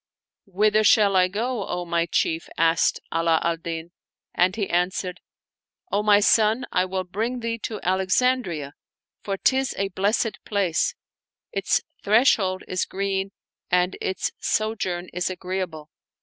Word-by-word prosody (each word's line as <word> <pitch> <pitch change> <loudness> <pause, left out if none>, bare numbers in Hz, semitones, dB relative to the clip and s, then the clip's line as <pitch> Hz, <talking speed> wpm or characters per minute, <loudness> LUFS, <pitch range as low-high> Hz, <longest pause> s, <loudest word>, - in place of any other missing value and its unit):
"Whither 210 +3 +2
shall 205 -2 +5
I 185 -1 +5
go, 220 +3 -2
O 180 0 -3
my 170 0 0
chief?" 160 0 0
asked 165 0 +3
Ala 165 -1 +2
al 170 0 0
Din; 165 0 -6 0.4
and 185 +2 +2
he 205 -3 -1
answered, 180 +1 -1 0.4
" - - -47
O 205 - +2
my 210 -1 +5
son, 220 +3 +3
I 180 - +2
will 185 0 -2
bring 225 +7 -3
thee 230 0 -3
to 215 -1 -5
Alex 190 +1 +1
andria, 190 - 0 0.5
for 195 -1 -3
'tis 265 +4 +1
a 195 0 -1
blessed 205 +4 0
place; 195 -6 0 0.6
its 195 0 0 0.2
threshold 205 -4 +3
is 185 - -1
green 195 0 -2 0.4
and 180 +1 +2
its 190 -1 -2
sojourn 190 -5 -1
is 180 +1 -1
agreeable." 180 -4 -5
190 Hz, 145 wpm, -24 LUFS, 175-210 Hz, 0.6 s, shall